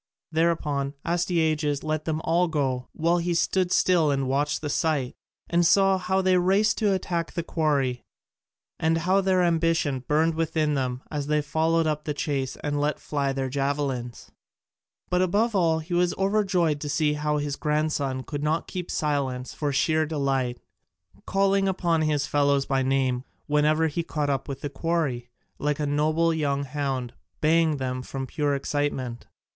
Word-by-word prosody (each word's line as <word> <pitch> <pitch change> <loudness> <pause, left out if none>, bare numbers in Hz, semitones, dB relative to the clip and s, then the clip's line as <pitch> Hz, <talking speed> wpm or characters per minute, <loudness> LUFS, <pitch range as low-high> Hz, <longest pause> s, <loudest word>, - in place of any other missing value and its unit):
Thereupon 150 -4 0
Astyages 160 -4 0
let 155 0 -2
them 160 -1 -1
all 175 +2 +2
go, 135 -5 -1
while 170 +2 +1
he 170 0 -1
stood 180 +2 +1
still 175 -5 +3
and 135 -2 0
watched 145 +2 0
the 155 - -3
sight, 150 -7 0 0.3
and 170 0 +2
saw 195 +2 +4
how 190 +1 0
they 185 -1 +4
raced 195 +4 +2
to 210 -3 +2
attack 175 -3 -2
the 170 - -2
quarry 140 -7 0 0.8
and 160 0 +2
how 185 +4 +2
their 185 -1 +2
ambition 165 -5 +1
burned 160 +2 +2
within 160 -1 0
them 130 -2 -2
as 145 -2 -3
they 150 0 +2
followed 160 +3 +1
up 150 -1 -1
the 150 - -2
chase 135 -3 -2
and 145 0 -1
let 150 +1 0
fly 140 -2 -1
their 135 0 -2
javelins. 135 -3 -3 0.8
But 180 0 +3
above 210 +5 +1
all 165 -4 +3
he 160 +3 -6
was 175 0 +2
overjoyed 190 -6 +1
to 150 - -4
see 150 +2 +1
how 150 0 -1
his 145 -1 -2
grandson 150 -4 -1
could 145 0 -5
not 155 +2 0
keep 180 -2 -5
silence 135 -4 -2
for 145 -2 -2
sheer 155 +3 +2
delight, 135 -5 -1 0.7
calling 195 0 +2
upon 170 -4 +1
his 150 -2 +1
fellows 140 -1 +2
by 135 -1 +1
name 130 -1 +1 0.2
whenever 150 +2 +2
he 160 +2 -1
came 150 -3 -2
up 135 -1 -2
with 140 -1 -6
the 145 - -3
quarry, 140 -5 -1 0.3
like 150 0 -1
a 150 - 0
noble 155 +3 +2
young 140 -3 0
hound, 135 -3 -3 0.3
baying 150 -5 +1
from 135 +1 -5
pure 145 +2 -1
excitement. 140 -4 -2
150 Hz, 165 wpm, -25 LUFS, 140-165 Hz, 0.8 s, saw